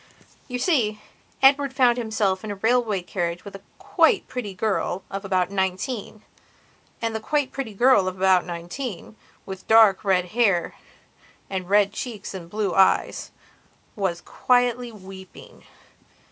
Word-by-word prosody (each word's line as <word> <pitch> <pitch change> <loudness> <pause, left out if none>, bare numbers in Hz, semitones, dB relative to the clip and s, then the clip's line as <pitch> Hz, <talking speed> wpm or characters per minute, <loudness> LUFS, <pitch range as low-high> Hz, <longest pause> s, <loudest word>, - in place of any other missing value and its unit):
You 250 -2 -4
see, 245 - +1 0.4
Edward 275 0 +4
found 250 -2 +3
himself 215 -4 -1
in 215 - -6
a 205 - -4
railway 220 -2 +1
carriage 175 -1 -4
with 200 - -9
a 195 - -10 0.2
quite 445 - +2
pretty 215 -7 -6
girl 195 -2 -1
of 195 +1 -5
about 185 -1 0
nineteen. 200 +3 -3 0.8
And 225 -1 -1
the - - -1
quite 290 +4 -1
pretty 250 -7 -6
girl 240 -4 +4
of 185 0 -4
about 185 -1 +3
nineteen, 175 +5 -7 0.3
with 190 -1 -9
dark 220 -3 +6
hair 190 0 +1 0.8
and 185 -1 -4
red 205 0 +3
cheeks 215 -4 -6
and 175 -3 -8
blue 210 -2 -2
eyes, 190 +2 +2 0.7
was 185 -4 -2
quietly 245 -1 0
weeping. 190 -2 -13
205 Hz, 135 wpm, -23 LUFS, 190-240 Hz, 0.8 s, dark